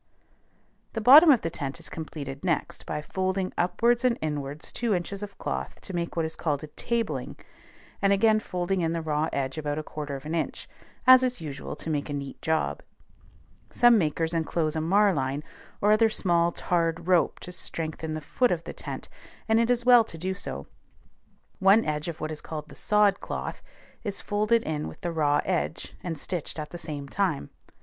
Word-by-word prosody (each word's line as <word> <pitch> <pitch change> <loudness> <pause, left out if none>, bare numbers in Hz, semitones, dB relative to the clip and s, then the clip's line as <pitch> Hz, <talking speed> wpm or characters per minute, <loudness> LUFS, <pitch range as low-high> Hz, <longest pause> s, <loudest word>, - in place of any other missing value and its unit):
The 225 - -2
bottom 285 +9 +9
of 260 -6 +6
the 165 - -2
tent 140 +1 -4
is 165 - -8
completed 145 -3 -7
next 170 -5 -2
by 150 0 -3
folding 190 +2 -1
upwards 235 +7 +2
and 250 -2 +3
inwards 150 -1 -4
two 235 -4 0
inches 195 +3 -4
of 205 -1 -7
cloth - - -4
to 190 - -9
make 170 -1 -3
what 165 -1 +1
is 160 - -5
called 150 -3 -1
a 155 - -7
"tabling," 205 - -2 0.6
and 195 0 +3
again 215 +2 +4
folding 180 -2 -2
in 165 0 0
the 165 - -2
raw 155 0 0
edge 135 +2 -2
about 145 -1 -2
a 155 - -3
quarter 150 -2 -5
of 135 +1 -8
an 155 - -4
inch, 165 -2 -2 0.4
as 255 0 +9
is 255 -3 0
usual 145 -4 -6
to 165 - -5
make 145 0 -2
a - - -3
neat 140 -1 -6
job. 160 0 0 0.9
Some 240 -2 +5
makers 160 0 0
enclose 160 -1 0
a 160 - 0
marline 160 -6 +2 0.4
or 210 - +4
other 220 +1 +5
small 170 -5 +2
tarred 165 -1 -1
rope 180 -2 +3
to 180 - -8
strengthen 160 -2 -4
the 155 - -4
foot 245 - +1
of 170 -2 -1
the - - -7
tent, - - -6 0.4
and 220 0 +4
it 230 +1 +2
is 245 -1 +2
well 245 -2 +8
to 165 - -9
do 185 +4 -2
so. 70 - -6 0.9
One 195 +4 +5
edge 150 +1 -2
of 165 -1 -5
what 155 - -3
is 155 - -5
called 155 -1 -7
the 140 - -12
"sod 210 +3 +3
cloth" - - -5 0.4
is 205 -3 -3
folded 215 +3 +1
in 155 -1 -2
with - - -10
the 175 - -2
raw 150 -3 +2
edge, 175 -3 -2
and 165 -3 -4
stitched 170 +2 -4
at 150 -1 -5
the 175 - -7
same 150 -4 -5
time. 170 - -1
170 Hz, 195 wpm, -27 LUFS, 150-200 Hz, 0.9 s, bottom